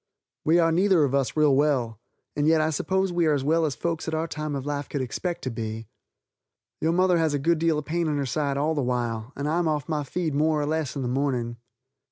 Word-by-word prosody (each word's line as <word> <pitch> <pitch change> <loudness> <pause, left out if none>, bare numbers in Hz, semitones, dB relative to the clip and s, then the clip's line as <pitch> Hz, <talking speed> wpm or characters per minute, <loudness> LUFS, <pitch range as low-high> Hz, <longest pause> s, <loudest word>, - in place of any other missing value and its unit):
We 160 +2 +4
are 165 -1 +4
neither 180 -1 +4
of 140 -2 0
us 140 +1 0
real 150 -3 +4
well, 130 -6 +1 0.4
and 150 0 +1
yet 160 0 +5
I 155 +1 +1
suppose 190 +4 0
we 170 -2 +2
are 150 - +3
as 135 - -2
well 160 +2 +2
as 140 - -3
folks 165 +6 -3
at 160 - -1
our 160 +1 -1
time 150 -2 -4
of 135 -1 -4
life 145 -1 -3
could 145 - -2
expect 175 +7 -4
to 130 - -2
be. 110 -1 -5 0.9
Your 160 - +1
mother 180 0 +3
has 160 -3 +1
a - - +1
good 165 +4 +1
deal 165 -1 +2
of 150 - -4
pain 170 +1 -1
in 150 -1 0
her 140 - -1
side 140 +1 -1
all 150 +3 +1
the 145 - -1
while 120 -2 -2
and 140 +1 -3
I 160 +3 +1
am 175 - +1
off 150 -3 -1
my 150 -2 -1
feed 160 +2 -2
more 155 +1 +2
or 145 - 0
less 155 -1 -2
in 140 - -3
the - - -1
morning. 125 -3 -1
150 Hz, 260 wpm, -25 LUFS, 135-165 Hz, 0.9 s, yet